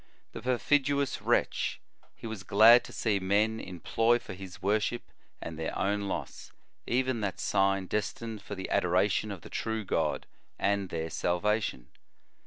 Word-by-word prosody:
The - - -8
perfidi 140 +3 +2
ous 140 - -2
wretch! - - +1 0.4
he - - -11
was 110 -3 -5
glad 110 +5 +7
to - - -10
see 105 -4 0
men 105 +4 +1
employ 115 +6 +1
for 120 - -9
his 95 -1 -9
worship 110 +4 0 0.4
and 80 -1 -7
their 80 - -3
own 100 +1 0
loss, - - -5 0.4
even 130 -1 0
that 100 -2 -2
si^n 95 -1 +1
destined 110 +1 -3
for 100 - -7
the 95 - -6
adoration 95 +4 +2
of 95 -4 -7
the - - -11
true 110 -1 -2
o - - -7
God, 80 -5 -1 0.3
and 100 -1 0
their 80 0 -3
salvation. 90 - -1
100 Hz, 160 wpm, -30 LUFS, 95-115 Hz, 0.4 s, glad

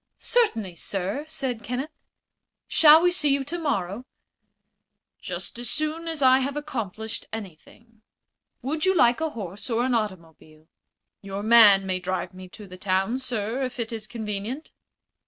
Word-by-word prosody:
"Certainly, 225 - 0
sir," 195 - -3
said 265 -7 -2
Kenneth. 260 +6 -4 0.7
"Shall 315 +1 +7
we 355 - +4
see 305 -4 +1
you 275 0 +2
tomorrow?" 255 - -2 1.2
"Just - - -6
as 240 -2 -4
soon 310 +3 -2
as 320 -4 -2
I 260 0 +6
have 275 +2 -2
accomplished 220 -7 -5
anything." 220 +3 -10 0.6
"Would 305 +4 -2
you 380 0 +3
like 245 -2 +4
a 320 - 0
horse 205 - -7
or 235 0 +1
an 260 - 0
automobile?" 165 -7 -5 0.5
"Your 195 0 -6
man 215 -4 +7
may 185 -1 -1
drive 185 +1 -3
me 185 0 -11
to 210 +3 -11
the 185 -1 -11
town, 195 +6 0
sir, 240 -1 -3
if 255 -1 -4
it 230 0 -3
is 220 -1 -6
convenient." 220 +5 -5
230 Hz, 150 wpm, -25 LUFS, 195-280 Hz, 1.2 s, Shall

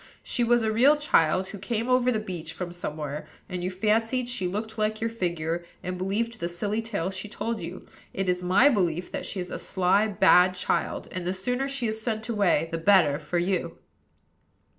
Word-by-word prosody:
She 240 - 0
was 240 0 +3
a 220 - +1
real 260 +7 +5
child, 185 - +2
who 205 - -8
came 230 +3 -2
over 255 0 +3
the 225 - +1
beach 185 -6 -5
from 180 -2 -5
somewhere; 150 -3 -5 0.2
and 180 -2 -4
you 180 - 0
fancied 225 +6 +1
she 215 -7 -1
looked 215 +4 -4
like 215 0 0
your 225 0 -1
figure, 170 -5 -2 0.2
and 180 0 -3
believed 220 +5 -1
the 170 - -2
silly 205 +5 -2
tale 200 -5 -3
she 190 +2 -5
told 230 +1 -3
you. 170 +2 -7 0.3
It 195 0 -2
is 180 0 +1
my 185 +9 +5
belief 180 - +1
that - - -4
she 195 - -4
is 180 0 -5
a - - -4
sly, 190 +3 +2
bad 185 -2 +5
child; 180 - -1
and 180 -1 -4
the 185 - 0
sooner 250 +8 -1
she 275 -3 -2
is 220 0 -2
sent 220 -1 -2
away 200 -7 +2
the 165 - -2
better 165 -5 +4
for 155 +3 -3
you." 180 +1 -1
195 Hz, 205 wpm, -26 LUFS, 180-225 Hz, 0.3 s, real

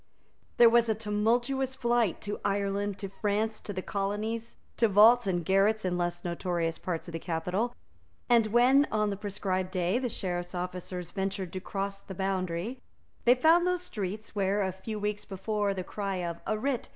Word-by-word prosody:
There 240 - +9
was 235 0 +4
a 220 - +2
tumultuous 240 +5 0
flight 240 -7 +1
to 205 0 -4
Ireland, 200 0 -1
to 200 -2 -5
France, 210 +2 -1
to - - -6
the 185 -2 -4
Colonies, 215 +3 -3 0.2
to 230 - +4
vaults 220 +3 +6
and 175 -3 0
garrets 200 +3 +3
in 180 -1 0
less 175 0 -2
notorious 170 -1 -1
parts 175 -2 -4
of - - -6
the 165 - -4
capital; 180 +9 -2 0.5
and 235 -3 +4
when, 255 +6 +5
on 210 -1 +1
the - - -2
prescribed 195 -2 -2
day, 185 +5 0
the 255 -1 -2
Sheriff's 175 -3 -3
officers 180 0 -5
ventured 195 -2 -3
to 190 - -3
cross 195 +1 -4
the 190 - -9
boundary, 190 +4 -2 0.4
they 245 +1 +7
found 330 +6 +5
those 360 0 0
streets 210 - -5
where, 200 0 +1
a 190 - 0
few 200 +4 -6
weeks 210 0 -2
before, 205 +1 -1
the 190 -2 -3
cry 200 +1 -3
of 170 -2 -3
"A 215 - +1
writ!" 255 +1 -2
200 Hz, 180 wpm, -29 LUFS, 185-225 Hz, 0.5 s, There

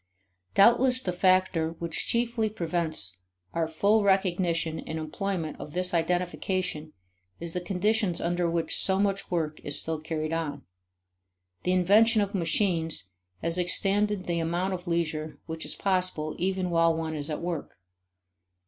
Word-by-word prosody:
Doubtless 250 +5 +5
the 180 - -1
factor 185 -3 +2
which 170 -1 -2
chiefly 235 -2 0
prevents 160 - -2 0.3
our 165 -1 0
full 200 +7 +2
recognition 175 -4 +1
and 160 - -5
employment 160 0 -3
of 150 - -8
this 180 +1 -1
identification 175 -1 -1 0.5
is 170 -1 -5
the 180 - -2
conditions 195 +1 0
under 175 0 0
which 165 -1 +1
so 190 -1 +3
much 195 -1 0
work 160 -3 -1
is 145 - +2
still 160 -1 -2
carried 155 0 -3
on. 155 -3 -3 1.0
The 180 - +2
invention 215 +5 +5
of 200 0 0
machines 165 - 0 0.3
has 165 +2 +1
extended 195 +2 +1
the 170 -1 -1
amount 175 +4 -1
of 180 0 -6
leisure 155 -3 -2
which 160 -1 -4
is - - -1
possible 180 -5 -1
even 185 0 0
while 165 -1 +3
one 160 -1 -3
is 150 0 -4
at 150 - -3
work. 170 - -4
175 Hz, 145 wpm, -27 LUFS, 160-190 Hz, 1.0 s, Doubtless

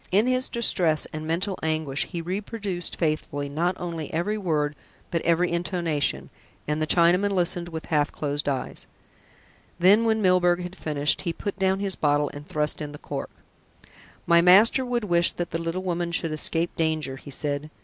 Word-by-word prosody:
In 205 +5 +3
his 255 0 +1
distress 175 -9 +2
and 155 0 -5
mental 185 +4 -1
anguish 155 -3 -1
he 170 -3 -5
reproduced 195 0 -4
faithfully 150 -3 -2
not 175 +5 -1
only 165 -3 -5
every 175 +6 -1
word, 155 -7 -1 0.4
but 170 - 0
every 170 +1 +2
intonation, 165 - -1 0.4
and 150 +1 -1
the 155 - 0
Chinaman 180 +4 +4
listened 175 -2 0
with 160 -1 -6
half 150 -2 +1
closed 145 -1 -2
eyes. 135 -2 -4 0.9
Then, 195 +6 +5
when 220 -1 +2
Milburgh 180 -2 +3
had 180 +1 -7
finished, 150 -4 0
he 170 - -2
put 200 +3 -5
down 190 0 +1
his 195 -2 0
bottle 145 -1 +1
and 145 +1 -9
thrust 150 +1 -1
in 150 -1 -5
the - - -8
cork. - - -6 1.0
"My 170 0 +5
master 205 +9 +6
would 245 -2 -1
wish 175 -3 +3
that 175 - -4
the 165 - -2
little 165 +3 -3
woman 175 -1 -2
should 165 -1 -1
escape 165 +2 0
danger," 155 -4 -1
he 140 - -12
said. 145 +1 -3
170 Hz, 175 wpm, -25 LUFS, 155-185 Hz, 1.0 s, master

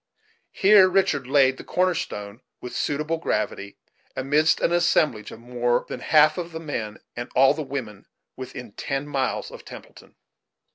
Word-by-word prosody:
Here 195 -1 +6
Richard 170 -8 +1
laid 135 -1 +3
the - - -9
corner 185 0 +1
stone, 105 -5 -6 0.2
with 125 - -8
suitable 150 +3 -1
gravity, 100 -8 -3 0.4
amidst 150 +4 +2
an - - +1
assemblage 160 -10 +1
of - - -11
more 120 0 -1
than - - -6
half 155 0 +4
the 170 -2 -5
men, 120 -10 -5 0.2
and 120 +1 -6
all 135 +2 +6
the 155 - -5
women, 130 -8 -6 0.3
within 130 -3 -8
ten 135 +6 -4
miles 135 -2 -2
of - - -11
Templeton. - - -13
135 Hz, 150 wpm, -24 LUFS, 120-160 Hz, 0.4 s, Here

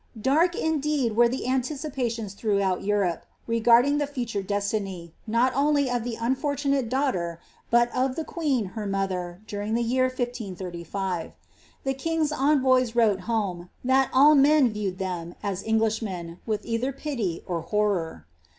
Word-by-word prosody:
Dark, 320 +9 +3
indeed, 295 -7 0
were 240 +1 +5
the 255 0 -3
anticipations 255 -5 -2
throughout 200 -3 0
Europe, 200 -4 0 0.2
reguding 235 +5 +4
the 290 - 0
future 240 -7 -3
destiny, 195 -4 -3
not 235 +4 +2
only 285 -1 +2
of 245 -2 0
the 240 -1 -3
unfortunate 275 +1 0
daughter, 205 - -1 0.3
but 240 0 +3
of 255 +1 +1
the 320 - -2
queen, 290 -10 -1
her 215 -2 -4
motlier, 190 -1 -3
during 210 +1 -3
the 235 - +1
year 255 +2 +2
1 - - -2 0.2
535. 185 -5 -5 0.5
The 270 - 0
king's 315 +2 -1
envoys 260 -4 +3
wrote 220 -5 +3
home, 185 -6 -1
that 265 +1 +3
all 285 +4 +7
men 285 -3 +5
viewed 205 -3 -3
them, 175 -3 -4
as 200 -2 -2
Englishmen, 220 -6 -1
with 215 -2 -2
either 235 +3 -1
pity 245 - -3
or 170 -2 -2
horror. 175 - -1
230 Hz, 145 wpm, -26 LUFS, 195-265 Hz, 0.5 s, all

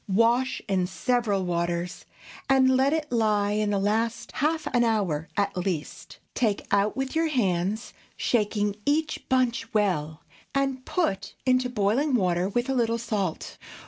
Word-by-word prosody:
Wash 235 +6 +2
in 185 -3 +1
several 210 -2 0
waters, 175 0 -2 0.4
and 260 -1 +5
let 265 +2 +3
it 310 -1 -2
lie 210 -3 +2
in 210 0 0
the 205 - +1
last 220 +4 -1
half 315 +3 0
an 240 -1 +4
hour 190 -9 0
at 200 -1 0
least. 180 -4 -4 0.2
Take 215 -5 0
out 200 +3 +2
with 270 +1 -3
your 325 0 +2
hands, 205 - -1 0.2
shaking 210 -3 0
each 305 +4 -1
bunch 245 -3 +1
well, 160 -7 0 0.3
and 270 -2 0
put 195 - -1
into 255 -1 +2
boiling 245 +6 +1
water, 180 -3 +1
with 240 +4 -1
a 270 - 0
little 230 -2 +1
salt. 210 -7 -3
220 Hz, 145 wpm, -26 LUFS, 195-255 Hz, 0.4 s, and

